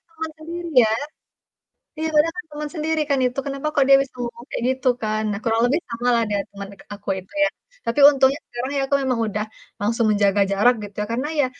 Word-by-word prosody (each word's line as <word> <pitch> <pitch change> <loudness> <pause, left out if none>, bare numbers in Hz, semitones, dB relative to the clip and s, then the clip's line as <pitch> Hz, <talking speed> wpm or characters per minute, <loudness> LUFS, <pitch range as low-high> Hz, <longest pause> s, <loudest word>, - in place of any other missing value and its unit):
Kan - - -38
teman 320 0 -4
sendiri 340 +2 -6
ya. 220 - +2 1.1
Iya 320 - 0
padahal 300 +2 +4
kan 360 - -5
teman 295 0 -5
sendiri 315 0 0
kan 280 -1 +2
itu, 250 +2 -1
kenapa 275 +1 -3
kok 280 - +5
dia 275 - +8 0.2
ngomong 240 -1 -6
kayak - - -3
gitu 260 0 -3
kan. 215 0 -1
Nah, 200 - -3
kurang 225 0 +1
lebih 285 +7 +1
sama 235 +1 -3
lah 230 - +2
niat 205 -1 -1
teman 200 0 -8
dekat 200 - -16
aku 200 0 -9
itu 185 - -15 0.2
ya. 295 - +3 0.4
Tapi 230 +5 -1
untungnya 270 0 +3
ya - - -52
sekarang 240 +2 -4 0.2
aku 280 - +2
memang 255 -3 0
udah 210 0 -2 0.4
langsung 230 +3 +1
menjaga 205 -1 +3
jarak 225 +6 +4
gitu 205 -1 -9
ya, - - -3
karena 255 +5 -1
ya, - - +3
245 Hz, 225 wpm, -22 LUFS, 215-290 Hz, 1.1 s, dia